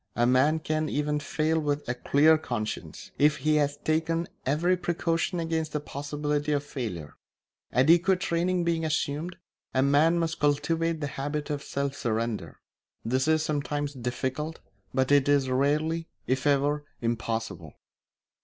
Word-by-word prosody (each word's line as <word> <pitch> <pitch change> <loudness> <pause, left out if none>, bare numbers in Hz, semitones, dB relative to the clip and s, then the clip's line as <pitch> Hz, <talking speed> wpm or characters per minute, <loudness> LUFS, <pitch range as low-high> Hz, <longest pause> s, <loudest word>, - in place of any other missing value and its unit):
A 120 - +3
man 130 +6 +4
can 155 -1 -1
even 150 0 0
fail 155 +2 0
with 145 -1 -2
a 120 - 0
clear 145 +5 +4
conscience, 120 -8 -5
if 150 +1 +4
he 150 +2 +2
has 145 -1 +1
taken 165 +2 0 0.2
every 165 +6 +2
precaution 175 0 -1
against 160 -1 -2
the 150 - 0
possibility 145 +1 -2
of 145 -1 0
failure. 105 - -6 0.5
Adequate 170 - +4
training 175 0 0
being 165 -1 0
assumed, 160 +2 -2 0.4
a 130 - +4
man 150 +5 +4
must 165 -1 -1
cultivate 165 +3 +1
the - - -1 0.2
habit 145 +1 -3
of 145 -1 -2
self 140 0 -3
surrender. 110 - -2 0.5
This 130 +4 +1
is 155 0 +3
sometimes 145 -1 -2
difficult, 130 +5 -3 0.3
but 130 +1 +1
it 145 -1 +4
is 140 -2 +3
rarely, 155 +5 +1 0.2
if 130 +2 0
ever, 145 +1 +2 0.2
impossible. 115 -1 -3
145 Hz, 145 wpm, -27 LUFS, 135-160 Hz, 0.5 s, man